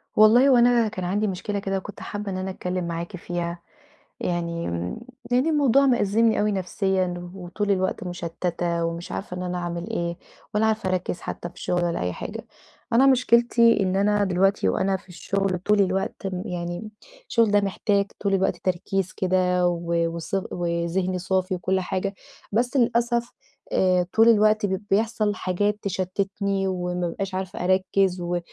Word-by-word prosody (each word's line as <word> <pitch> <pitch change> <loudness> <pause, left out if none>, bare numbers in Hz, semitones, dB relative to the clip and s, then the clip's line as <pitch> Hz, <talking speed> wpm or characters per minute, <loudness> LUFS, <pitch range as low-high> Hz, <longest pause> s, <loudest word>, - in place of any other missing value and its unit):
والله 235 +6 +7
هو 255 - +6
أنا 240 -1 +4
كان 185 -4 -5
عندي 205 +4 0
مشكلة 200 +2 -3
كده 195 0 -2
وكنت 195 +2 -8
حابة 205 -1 -5
إن 185 - -3
أنا 185 +1 -3
أتكلم 180 -1 -3
معاكِ 170 +2 -4
فيها، 175 0 -4 0.6
يعني، 170 -1 -2 0.7
يعني 255 +6 +3
الموضوع 280 -3 +4
مأزِّمني 230 -2 +3
أوي 210 0 +2
نفسيًا، 185 -2 -1
وطول 195 +3 -2
الوقت 185 -1 0
مُشتّتة 175 -1 -2
ومش 170 +1 -4
عارفة 180 -2 -5
إن 180 - -4
أنا 180 0 -3
أعمل 175 0 -4
إيه 170 0 -2 0.4
ولا 215 +1 +3
عارفة 220 -3 0
أركّز 180 -1 -2
حتى 175 - -5
في 180 - -14
شغل 175 -1 +1
ولا 170 -1 -1
أي 90 0 -1
حاجة، - - -7 0.5
أنا 260 +4 +6
مشكلتي 235 -2 +4
إن 185 -1 +1
أنا 205 +1 +2
دلوقتي 190 - +2
وأنا 190 - +1
في 190 - -21
الشغل 190 +1 -1
طول 210 +3 +3
الوقت 195 +1 -1 0.2
يعني، 175 +2 -5 0.4
الشغل 230 -3 +3
ده 205 0 +4
محتاج 200 0 0
طول 200 -1 0
الوقت 190 0 +1
تركيز 185 +1 -1
كده 180 -1 +2
و 170 -1 0
وص 170 +3 -4 0.2
وذهن 175 +2 -1
صافي 185 +1 0
وكُلّ 185 +1 0
حاجة، 190 +2 -2 0.4
بس 245 +6 +1
للأسف 235 0 +1 0.4
آآ، 180 -1 +3
طول 225 +1 +6
الوقت 215 -1 +4
ب 190 -1 -2
بيحصل 215 0 +1
حاجات 205 +3 0
تشتِّتني 195 +1 -1
وما 180 -1 -2
بابقاش 190 +2 -4
عارفة 185 -1 -4
أركّز 185 0 +2
و 175 0 -1
190 Hz, 160 wpm, -24 LUFS, 180-210 Hz, 0.7 s, والله